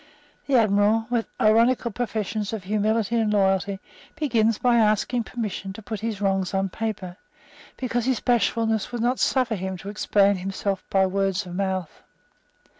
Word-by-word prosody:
The 280 - +2
Admiral, 215 0 +3
with 235 -2 0
ironical 230 +2 +3
professions 215 -2 -3
of 215 -4 -4
humility 215 +3 0
and 220 -2 +1
loyalty, 195 -1 +1 0.4
begins 230 -7 +1
by 245 -1 +3
asking 225 +2 +2
permission 210 -5 -5
to 220 - -10
put 220 0 -5
his 220 -2 -3
wrongs 195 -1 0
on 195 0 0
paper, 190 -4 -4 0.6
because 245 -2 -2
his 260 -3 +1
bashfulness 225 -2 +1
would 240 -2 -3
not 245 +2 +1
suffer 255 -4 +2
him 190 -2 -4
to 195 - -8
explain 200 -1 +2
himself 195 +1 -3
by 190 -1 +3
word 195 0 0
of 180 - -8
mouth. 190 -3 -3
210 Hz, 155 wpm, -24 LUFS, 195-230 Hz, 0.6 s, Admiral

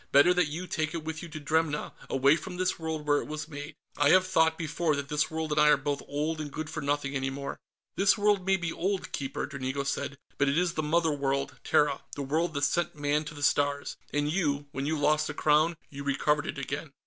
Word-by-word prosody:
Better 145 +6 +6
that 180 -3 +2
you 165 +5 -5
take 155 -2 -2
it 165 - -4
with 160 0 -4
you 170 - -8
to 155 - -7
Dremna, 155 0 0 0.2
away 135 +3 +4
from 170 +2 -6
this 185 -1 0
world 160 -2 -3
where 145 -1 +3
it - - -8
was 155 0 -5
made. 145 0 -8 0.2
I 145 0 +4
have 185 +3 +6
thought, 160 -3 +3
before, 160 -1 0
that 140 0 -4
this 150 0 +1
world 160 -1 -3
and 150 0 +3
I 150 - +6
are 150 - +6
both 145 -1 -2
old 155 +2 -2
and 145 -1 -6
good 155 +1 -5
for - - -4
nothing 145 0 -1
any 135 0 0
more." 140 +1 -5 0.4
"This 195 +2 +4
world 205 -2 +3
may 190 +1 +3
be 170 -2 -3
old, 190 +2 -2
Keeper," 135 -1 -3
Dranigo 140 -1 -3
said, 140 +1 -2 0.2
"but 140 0 +3
it 140 - +1
is 175 -1 +2
the 155 - -1
Mother 160 +1 +2
World, 140 -1 -1
Terra, 145 -2 +2
the 145 - -3
world 155 +4 0
that 140 - -1
sent 165 +4 +1
Man 145 +1 0
to 150 +1 -8
the 145 - -6
Stars. 145 0 +1 0.2
And 145 0 0
you 150 -4 0
when 135 +1 -3
you 160 +1 0
lost 150 +1 +2
the - - -5
Crown, 155 +2 +3
you 140 0 -7
recovered 145 +1 +1
it - - -4
again." 140 +2 -4
150 Hz, 245 wpm, -29 LUFS, 140-160 Hz, 0.4 s, Better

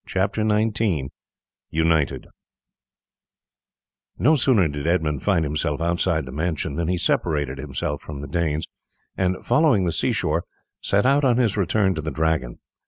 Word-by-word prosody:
CHAPTER 100 +3 -1
XIX: 105 -9 +1 0.6
UNITED 80 -2 +1 1.9
No 150 +6 +4
sooner 120 - +3
did 75 0 -4
Edmund 80 -5 0
find 90 -6 +1
himself 75 0 -2
outside 85 -1 0
the 65 - -8
mansion 80 0 -2
than 80 +2 -2
he 90 +1 0
separated 75 -5 0
himself 70 +1 -4
from 75 -2 -8
the 70 - -6
Danes, 80 0 -1 0.5
and 90 -1 -1
following 120 - +3
the 85 - 0
sea 80 - 0
shore, - - -1 0.4
set 100 +2 +1
out 140 +2 +3
on 125 -3 +3
his 115 -5 +2
return 100 0 +1
to 80 - -4
the 80 - -3
Dragon. 80 -4 -1
85 Hz, 150 wpm, -23 LUFS, 75-100 Hz, 1.9 s, No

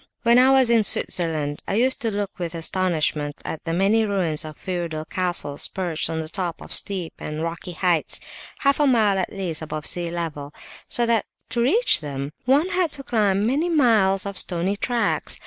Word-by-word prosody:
When 235 +1 +6
I 260 +1 +6
was 265 -3 +4
in 230 -2 +4
Switzerland 155 -7 0
I 195 - -1
used 260 +4 +2
to 230 - +1
look 205 -2 -4
with 170 -1 -4
astonishment 160 -4 -1
at 160 - -5
the 165 - -2
many 195 +6 +3
ruins 185 -7 0
of 155 -1 -9
feudal 170 -4 -4
castles 175 -5 -1
perched 175 -5 -3
on 160 0 -2
the 155 - -6
top 175 0 -3
of - - -6
steep 185 -5 0
and 150 +1 -4
rocky 170 +2 -5
heights, 175 -2 0 0.4
half 280 0 +3
a 295 - +4
mile 215 -6 +3
at 185 - -2
least 180 -6 -4
above 155 -1 -5
sea 175 -1 +1
level, 155 -4 -5 0.3
so 240 - +1
that 230 -2 +1 0.3
to 235 +1 0
reach 400 - +4
them 140 -1 -5
one 285 +8 +3
had 355 -4 +1
to 275 - -6
climb 205 -5 +1
many 290 +9 +1
miles 220 - +3
of 200 -1 -2
stony 180 +3 +1
tracks. 235 +3 0
190 Hz, 190 wpm, -23 LUFS, 165-230 Hz, 0.4 s, When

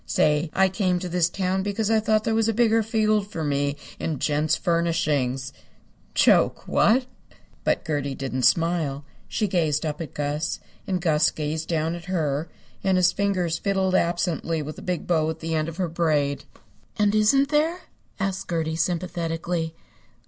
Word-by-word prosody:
Say, 150 +1 +2
I 190 0 +5
came 185 -1 0
to 180 +1 -4
this 175 -1 +1
town 190 0 -1
because 205 +2 -1
I 220 - +4
thought 215 0 +2
there 225 - 0
was 225 0 +2
a 225 - 0
bigger 225 -1 +4
field 215 -2 +1
for 165 -6 -5
me 140 -1 0 0.2
in 155 -3 -2
Gents' 150 +3 +1
Furnishings. 150 -7 0 0.6
Joke, - - +3
what?" 250 +4 +3 0.6
But - - 0
Gertie 145 -4 -2
didn't 130 -1 -3
smile. 160 -2 +1 0.2
She 215 - -1
gazed 160 -4 +1
up 155 +2 -3
at 155 - -7
Gus, 150 +1 -2 0.3
and 185 -2 0
Gus 160 -4 +3
gazed 155 +1 -4
down 160 -1 0
at 175 0 -7
her, 160 -4 -1 0.3
and 190 -1 +3
his 180 0 +4
fingers 180 -4 0
fiddled 190 -2 0
absently 170 -2 0
with 150 +1 -7
the - - -8
big 180 -2 -3
bow 160 -3 +1
at 160 0 -4
the 165 0 -3
end 155 0 0
of 165 - -9
her 185 -2 0
braid. 150 -4 0 0.5
"And 205 -1 +3
isn't 270 +7 +4
there?" 315 +4 +1 0.4
asked 195 -1 -2
Gertie, 160 -2 -1
sympathetically. 165 -1 -2
170 Hz, 170 wpm, -24 LUFS, 155-195 Hz, 0.6 s, I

